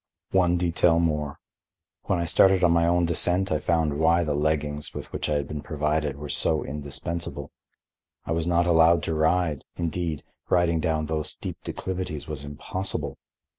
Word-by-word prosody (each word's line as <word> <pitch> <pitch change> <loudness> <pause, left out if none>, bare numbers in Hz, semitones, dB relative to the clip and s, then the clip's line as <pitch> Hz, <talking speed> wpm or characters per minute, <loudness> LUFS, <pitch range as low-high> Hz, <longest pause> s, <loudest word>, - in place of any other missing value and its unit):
One 90 -2 +3
detail 85 -1 +2
more. 75 -3 -1 0.7
When 95 - +1
I 85 - -1
stared 95 +2 +4
on 85 - +5
my 85 0 +3
own 85 0 +3
descent 90 +3 +3
I 75 - +1
found 80 -2 0
why 85 +2 +4
the 75 -3 -1
leggings, 75 0 -1
with - - -7
which - - -2
I 75 - +1
had 70 -1 -1
been 75 -1 -5
provided, 75 -2 -1
were 75 +1 -7
so 80 +2 +1
indispensable. 75 +4 -5 0.7
I - - -4
was 80 0 0
not 85 0 +2
allowed 85 -1 +4
to 80 - -1
ride; 80 -1 +1
indeed, 85 -2 -3 0.3
riding 85 -2 +2
down 80 -1 0
those 75 0 -1
steep - - -5
declivities 90 -5 -4
was 75 -3 -6
impossible. 75 +6 -4
80 Hz, 170 wpm, -25 LUFS, 75-85 Hz, 0.7 s, on